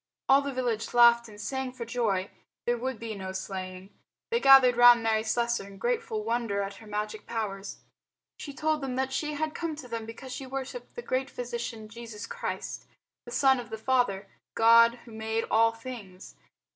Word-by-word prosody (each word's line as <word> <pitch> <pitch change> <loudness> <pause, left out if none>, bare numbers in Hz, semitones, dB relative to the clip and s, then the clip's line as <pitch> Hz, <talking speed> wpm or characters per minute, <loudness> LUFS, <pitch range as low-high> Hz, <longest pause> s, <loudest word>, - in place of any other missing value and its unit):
All 270 +1 +6
the 280 0 -3
village 245 -4 -2
laughed 235 -1 +6
and 210 -1 -13
sang 265 +2 -3
for 245 -2 -6
joy. 220 -5 -1 0.3
There 240 - +2
would 255 +1 -3
be 225 0 -5
no 190 -2 -6
slaying. 190 0 -6 0.4
They 470 - +2
gathered 270 - +7
round 240 -1 +7
Mary 220 -1 +2
Slessor 235 -1 -1
in 200 -1 -12
grateful 465 - -1
wonder 230 - -1
at 195 0 -6
her 220 - -14
magic 210 0 -4
powers. 205 -3 -4 0.6
She 290 - -6
told 305 +1 -1
them 265 -2 -3
that 265 0 -1
she 300 +2 -2
had 310 +1 -2
come 330 -2 -3
to 290 -4 -9
them 230 -2 -5
because 250 +3 -8
she 265 +1 -6
worshipped 270 - -6
the 480 - -6
Great 260 +1 -1
Physician 235 -2 -5
Jesus 225 -1 -8
Christ, 480 +1 -5 0.4
the - - -9
Son 265 -2 +4
of 240 -1 -8
the 220 - -5
Father 220 -5 +1 0.3
God 230 +1 +6
who 235 - -13
made 220 +1 -2
all 225 +1 +5
things. 225 -6 -10
235 Hz, 185 wpm, -28 LUFS, 220-265 Hz, 0.6 s, gathered